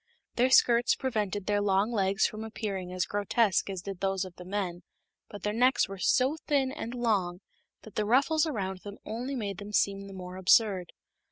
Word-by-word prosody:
Their 250 Hz, +2 st, +3 dB
skirts 240 Hz, -2 st, +5 dB
prevented 210 Hz, -6 st, -2 dB
their 205 Hz, 0 st, +1 dB
long 200 Hz, +2 st, +2 dB
legs 200 Hz, -2 st, +2 dB
from 215 Hz, +1 st, -3 dB
appearing 200 Hz, -5 st, -4 dB
as 180 Hz, -1 st, -1 dB
grotesque 205 Hz, 0 st, +1 dB
as 190 Hz, -2 st, -5 dB
did 195 Hz, -2 st, -6 dB
those 195 Hz, 0 st, 0 dB
of 180 Hz, -2 st, -11 dB
the 180 Hz, -, -10 dB
men, 185 Hz, -2 st, -3 dB, 0.5 s
but 205 Hz, -, -10 dB
their 210 Hz, -, -1 dB
necks 250 Hz, +4 st, +3 dB
were 195 Hz, -1 st, -8 dB
so 265 Hz, +10 st, +2 dB
thin 275 Hz, -3 st, +2 dB
and 250 Hz, -4 st, -6 dB
long 200 Hz, -7 st, 0 dB, 0.4 s
that 220 Hz, -, -12 dB
the 210 Hz, -, -1 dB
ruffles 285 Hz, +8 st, +3 dB
around 190 Hz, -9 st, -3 dB
them 205 Hz, +1 st, -9 dB
only 245 Hz, +5 st, -4 dB
made 200 Hz, -6 st, -4 dB
them 205 Hz, 0 st, -8 dB
seem 200 Hz, -1 st, +1 dB
the 195 Hz, -, -10 dB
more 180 Hz, -1 st, -8 dB
absurd. 190 Hz, -1 st, +3 dB
205 Hz, 190 wpm, -29 LUFS, 190-235 Hz, 0.5 s, skirts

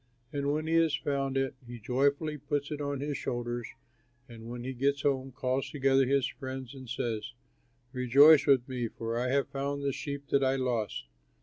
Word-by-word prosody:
And 140 Hz, 0 st, 0 dB
when 155 Hz, +1 st, -1 dB
he 160 Hz, -, -1 dB
has 165 Hz, -2 st, +3 dB
found 135 Hz, -1 st, -1 dB
it, 135 Hz, 0 st, 0 dB
he 120 Hz, 0 st, -7 dB
joyfully 140 Hz, +6 st, 0 dB
puts 145 Hz, +1 st, -2 dB
it 150 Hz, -1 st, -3 dB
on 140 Hz, -1 st, -2 dB
his 145 Hz, 0 st, -2 dB
shoulders 120 Hz, -1 st, -3 dB, 0.6 s
and 115 Hz, -1 st, -10 dB
when 120 Hz, 0 st, -6 dB
he 130 Hz, +1 st, -4 dB
gets 140 Hz, +2 st, 0 dB
home 135 Hz, -2 st, 0 dB
calls 130 Hz, 0 st, -1 dB
together 135 Hz, -3 st, +3 dB
his 135 Hz, 0 st, +2 dB
friends 130 Hz, -2 st, -7 dB
and 130 Hz, -3 st, -10 dB
says, 115 Hz, -2 st, -3 dB, 0.6 s
'Rejoice 140 Hz, +4 st, +6 dB
with 130 Hz, -3 st, +4 dB
me, 125 Hz, -3 st, -2 dB
for 115 Hz, +1 st, -4 dB
I 125 Hz, -, 0 dB
have 140 Hz, +2 st, +1 dB
found 140 Hz, +1 st, -3 dB
the 140 Hz, -1 st, 0 dB
sheep 140 Hz, 0 st, -6 dB
that 140 Hz, -1 st, +3 dB
I 130 Hz, 0 st, +3 dB
lost.' 120 Hz, -, -1 dB
135 Hz, 190 wpm, -30 LUFS, 125-140 Hz, 0.6 s, Rejoice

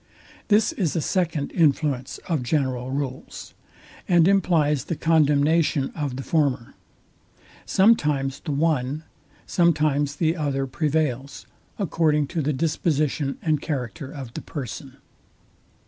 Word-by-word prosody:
This 210 Hz, +1 st, +3 dB
is 180 Hz, -6 st, -1 dB
a -, -, +1 dB
second 160 Hz, -3 st, -1 dB
influence 145 Hz, -4 st, +1 dB
of 160 Hz, -6 st, 0 dB
general 130 Hz, -1 st, -1 dB
rules, 135 Hz, -1 st, -5 dB, 0.5 s
and 175 Hz, -2 st, +5 dB
implies 160 Hz, -8 st, +2 dB
the 170 Hz, -, -3 dB
condemnation 150 Hz, -2 st, +2 dB
of 145 Hz, -5 st, -3 dB
the 135 Hz, -, -5 dB
former. 140 Hz, -7 st, 0 dB, 0.9 s
Sometimes 150 Hz, -10 st, +2 dB
the 155 Hz, -, -5 dB
one, 145 Hz, -1 st, 0 dB, 0.4 s
sometimes 150 Hz, -4 st, +2 dB
the 160 Hz, +1 st, +1 dB
other 140 Hz, -4 st, -1 dB
prevails, 140 Hz, -2 st, -2 dB, 0.3 s
according 160 Hz, -6 st, +1 dB
to 165 Hz, -, -2 dB
the 150 Hz, +1 st, 0 dB
disposition 150 Hz, -1 st, 0 dB
and 155 Hz, -3 st, +1 dB
character 135 Hz, -2 st, -4 dB
of 130 Hz, -6 st, -8 dB
the -, -, -5 dB
person. 135 Hz, -1 st, -7 dB
150 Hz, 115 wpm, -24 LUFS, 135-160 Hz, 0.9 s, and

